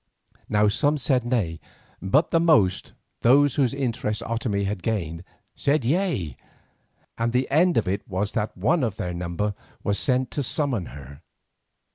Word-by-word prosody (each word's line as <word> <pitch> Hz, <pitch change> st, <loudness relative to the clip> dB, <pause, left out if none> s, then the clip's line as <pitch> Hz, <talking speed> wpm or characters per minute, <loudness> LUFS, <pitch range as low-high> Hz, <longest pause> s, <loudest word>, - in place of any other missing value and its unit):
Now 105 Hz, 0 st, +3 dB
some 145 Hz, +8 st, +2 dB
said 130 Hz, -3 st, +1 dB
nay, 105 Hz, -10 st, -1 dB, 0.4 s
but 140 Hz, -, +2 dB
the 165 Hz, -, +4 dB
most, 150 Hz, -, +3 dB, 0.3 s
those 140 Hz, +3 st, +5 dB
whose 135 Hz, -5 st, +2 dB
interest 120 Hz, -6 st, -2 dB
Otomie 115 Hz, -3 st, -1 dB
had 100 Hz, -1 st, -3 dB
gained, 85 Hz, -7 st, -2 dB, 0.3 s
said 140 Hz, -3 st, 0 dB
yea, 135 Hz, -, 0 dB, 0.8 s
and 115 Hz, +1 st, 0 dB
the 125 Hz, +1 st, +1 dB
end 170 Hz, +5 st, +4 dB
of 110 Hz, -, +1 dB
it 95 Hz, +2 st, -2 dB
was 100 Hz, +2 st, -2 dB
that 105 Hz, -4 st, -3 dB
one 130 Hz, -, +2 dB
of 110 Hz, -5 st, -1 dB
their 90 Hz, -1 st, -3 dB
number 90 Hz, +4 st, -2 dB, 0.3 s
was 100 Hz, 0 st, 0 dB
sent 130 Hz, -1 st, +1 dB
to 145 Hz, -, -2 dB
summon 130 Hz, -, -1 dB
her. 70 Hz, +1 st, -11 dB
115 Hz, 155 wpm, -24 LUFS, 95-140 Hz, 0.8 s, those